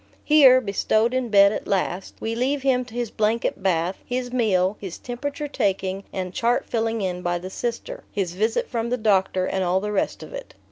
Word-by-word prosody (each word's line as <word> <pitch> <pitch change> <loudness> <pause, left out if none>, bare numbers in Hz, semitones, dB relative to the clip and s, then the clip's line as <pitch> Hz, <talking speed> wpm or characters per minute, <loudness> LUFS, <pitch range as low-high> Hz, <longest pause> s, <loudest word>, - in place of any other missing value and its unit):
Here, 275 -4 +7
bestowed 220 +1 +1
in 255 -2 -1
bed 200 -1 +6
at - - -5
last, 190 -1 -2
we 225 - -3
leave 265 +4 -1
him 255 -2 +2
to 235 -1 -13
his 240 -3 -2
blanket 220 0 0
bath, 180 -1 0
his 245 0 -4
meal, 200 -5 +2
his 190 -4 -7
temperature 285 +4 -5
taking 195 -6 -1
and 185 -1 -4
chart 235 +4 +1
filling 225 -1 -1
in 180 -1 -2
by 175 0 -1
the 185 +2 -8
Sister, 245 - -4
his 190 -5 -2
visit 220 +5 0
from 235 -1 -2
the 250 - 0
doctor, 190 -4 +2
and 190 0 -1
all 180 +1 +2
the 210 +2 -3
rest 205 - -1
of - - -11
it. - - -8
220 Hz, 200 wpm, -23 LUFS, 190-245 Hz, -, Here